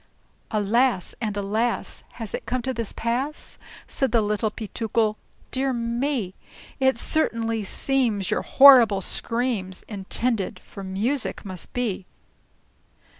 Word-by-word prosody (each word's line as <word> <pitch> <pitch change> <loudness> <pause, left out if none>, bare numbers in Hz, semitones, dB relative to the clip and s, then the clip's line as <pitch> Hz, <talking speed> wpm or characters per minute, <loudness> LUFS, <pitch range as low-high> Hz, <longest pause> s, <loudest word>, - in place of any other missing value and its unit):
"Alas! 215 0 +1
and 210 -3 -2
alas! 215 +4 -1
has 225 -3 -7
it - - -5
come 245 +1 -1
to 260 - -2
this 230 -3 -3
pass?" 255 +7 -3 0.3
Said 270 -4 -1
the 230 -2 +3
Little 210 +1 0
Peetookle. 220 0 -1 0.4
"Dear 265 0 0
me! 235 -3 -1 0.5
It 265 -2 +3
certainly 230 -6 0
seems 220 -2 0
your - - +1
horrible 245 -8 +7
screams 230 -4 -2
Intended 210 +1 -2
for 195 - -11
music 210 +10 -1
must 185 -3 -7
be!" 215 -7 -2
230 Hz, 120 wpm, -24 LUFS, 205-250 Hz, 0.5 s, horrible